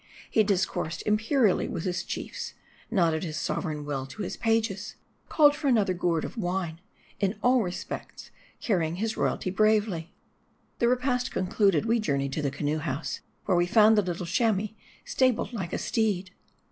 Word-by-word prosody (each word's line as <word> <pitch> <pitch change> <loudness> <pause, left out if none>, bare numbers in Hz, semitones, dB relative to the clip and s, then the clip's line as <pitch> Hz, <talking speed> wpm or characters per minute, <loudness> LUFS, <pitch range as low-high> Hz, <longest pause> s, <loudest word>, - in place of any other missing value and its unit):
He 220 - +4
discoursed 185 -5 -1
imperially 220 0 +2
with 165 - -4
his 180 -1 -1
chiefs; - - -5 0.3
nodded 170 -7 +2
his 155 -3 -4
sover - - -2
eign 150 -3 -4
will 135 -2 -3
to 200 +10 -6
his - - -4
pages; 225 -3 0 0.3
called 295 -2 +5
for 300 -1 -3
another 215 -7 +3
gourd 175 -2 0
of - - -8
wine; 175 -4 -2 0.4
in 200 +1 0
all 250 0 +5
respects 180 -3 -6 0.3
carrying 170 -7 0
his 220 +4 -2
royalty 185 - -1
bravely. 205 -4 +2 0.7
The 235 - +3
repast 250 0 +1
concluded, 195 -1 +2
we 230 +1 +2
journeyed 140 -8 -1
to 155 - -1
the 140 - 0
canoe 145 +3 -2
house, 150 -1 -3 0.3
where 190 - +2
we 175 0 +3
found 215 +3 +6
the 210 - +5
little 180 -1 -3
Chamois 215 +2 +1 0.4
stabled 255 -2 +1
like 190 -7 -4
a - - -1
steed. 200 -5 0
190 Hz, 165 wpm, -27 LUFS, 170-225 Hz, 0.7 s, found